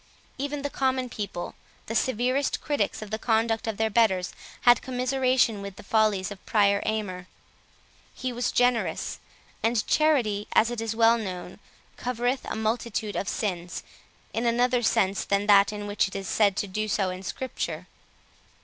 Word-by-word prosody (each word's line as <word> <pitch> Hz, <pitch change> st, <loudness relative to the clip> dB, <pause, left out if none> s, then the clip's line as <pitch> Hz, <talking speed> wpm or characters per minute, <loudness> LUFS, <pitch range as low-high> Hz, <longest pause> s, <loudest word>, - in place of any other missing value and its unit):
Even 285 Hz, +1 st, -3 dB
the 285 Hz, -, -2 dB
common 260 Hz, -1 st, 0 dB
people, 200 Hz, -6 st, -5 dB, 0.3 s
the 225 Hz, -, -5 dB
severest 255 Hz, +4 st, +1 dB
critics 290 Hz, -6 st, -1 dB
of 210 Hz, -, -10 dB
the 220 Hz, -, -2 dB
conduct 225 Hz, 0 st, +1 dB
of 220 Hz, -2 st, -2 dB
their 220 Hz, 0 st, +1 dB
betters, 190 Hz, -5 st, +2 dB, 0.3 s
had 240 Hz, 0 st, +6 dB
commiseration 255 Hz, -3 st, +1 dB
with 200 Hz, -1 st, -7 dB
the -, -, -12 dB
follies 210 Hz, -2 st, +2 dB
of 200 Hz, -, -9 dB
Prior 200 Hz, -2 st, +3 dB
Aymer. 185 Hz, -5 st, -2 dB, 0.9 s
He 255 Hz, -1 st, -3 dB
was 245 Hz, +1 st, -1 dB
generous; 245 Hz, -1 st, +1 dB, 0.4 s
and 225 Hz, -1 st, +1 dB
charity, 240 Hz, -10 st, +2 dB
as 230 Hz, +2 st, +4 dB
it 240 Hz, -2 st, -3 dB
is 225 Hz, -1 st, -2 dB
well 230 Hz, +1 st, +5 dB
known, 185 Hz, -4 st, -6 dB, 0.4 s
covereth 245 Hz, +1 st, -1 dB
a -, -, -4 dB
multitude 220 Hz, -1 st, -2 dB
of 200 Hz, -, -2 dB
sins, 180 Hz, -5 st, -3 dB, 0.5 s
in 230 Hz, +1 st, 0 dB
another 245 Hz, +1 st, +2 dB
sense 195 Hz, -4 st, +2 dB
than 200 Hz, 0 st, 0 dB
that 200 Hz, -1 st, +6 dB
in 205 Hz, -1 st, -5 dB
which 205 Hz, -1 st, +1 dB
it 190 Hz, -, -10 dB
is 195 Hz, -1 st, -4 dB
said 200 Hz, -3 st, +2 dB
to -, -, 0 dB
do 215 Hz, +3 st, -2 dB
so 195 Hz, -3 st, 0 dB
in 185 Hz, 0 st, -6 dB
Scripture. 180 Hz, -6 st, -4 dB
220 Hz, 165 wpm, -26 LUFS, 200-245 Hz, 0.9 s, had